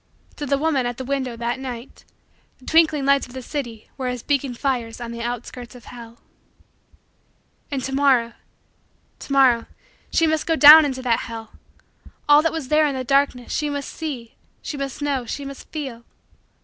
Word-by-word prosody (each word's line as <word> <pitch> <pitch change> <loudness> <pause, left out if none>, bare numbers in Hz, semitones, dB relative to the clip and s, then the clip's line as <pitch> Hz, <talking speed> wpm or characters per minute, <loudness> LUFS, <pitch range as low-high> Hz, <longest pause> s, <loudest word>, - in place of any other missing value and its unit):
To 290 - -4
the 280 - +2
woman 280 -4 +1
at 245 -1 -4
the 260 - -6
window, 260 -3 -2
that 235 +2 -2
night, 250 -2 -8 0.5
the 255 - -20
twinkling 315 -3 +3
lights 280 -1 +3
of 245 - -15
the 260 -1 -7
city 240 -6 -6
were 260 - -2
as 250 -2 -4
beacon 275 -3 -1
fires 240 -3 -2
on 235 -1 -6
the 235 0 -6
outskirts 245 +1 -6
of 245 - -14
hell. 235 -1 -11 1.5
And 275 -4 -3
to 270 - -4
morrow 265 -4 +3 0.9
to - - -10
morrow 260 -4 +4 0.4
she 330 - +3
must 315 -1 0
go 325 - +2
down 305 +1 +10
into 260 -2 -3
that 235 -3 +2
hell. 225 -1 -8 0.8
All 295 0 +7
that 325 - +1
was 320 -5 -5
there 305 0 +4
in 280 - -2
the 260 - -3
darkness, 275 -2 +1
she 300 -1 -1
must 285 -1 -4
see, 270 -8 -6 0.3
she - - -5
must 275 0 -5
know, 270 -4 -1
she 280 - -5
must 275 0 -10
feel. 265 -7 -6
265 Hz, 185 wpm, -22 LUFS, 240-285 Hz, 1.5 s, down